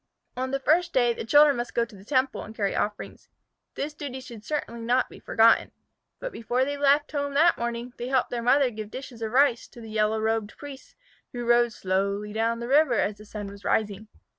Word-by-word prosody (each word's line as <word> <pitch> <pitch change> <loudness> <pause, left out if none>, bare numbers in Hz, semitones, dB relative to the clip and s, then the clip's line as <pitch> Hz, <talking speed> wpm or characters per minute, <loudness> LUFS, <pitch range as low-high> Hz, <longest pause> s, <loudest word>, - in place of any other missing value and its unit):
On 260 +1 -2
the 275 +1 -1
first 340 +5 +2
day 240 -2 +3
the - - -6
children 290 +3 +5
must 240 0 -5
go 235 - +2
to 230 -2 -16
the 190 - -14
temple 260 +3 0
and 220 - -10
carry 200 -3 -1
offerings. 210 0 -4 0.5
This 295 +1 -4
duty 280 -3 -6
should 235 -4 -11
certainly 235 -6 -4
not 245 +3 +1
be - - -12
forgotten. 225 0 +3 0.4
But - - -6
before 245 - -1
they 285 +1 -3
left 285 +1 +2
home 285 -1 -2
that 335 +4 +5
morning 235 +1 -4
they 240 - -5
helped 260 -1 +1
their 240 -1 -2
mother 255 +2 +3
give 215 -1 -7
dishes 255 -1 -9
of 220 -1 -3
rice 260 -2 +3
to - - -15
the 225 -2 -10
yellow 215 0 +1
robed 220 -1 -1
priests 285 -2 -11 0.4
who 240 -1 -4
rowed 240 0 +4
slowly 200 +2 -2
down 230 +1 0
the 235 - -4
river 275 -3 +4
as 205 0 -1
the 210 - -12
sun 205 0 -7
was 200 0 -10
rising. 215 +1 -1
240 Hz, 215 wpm, -26 LUFS, 220-275 Hz, 0.5 s, children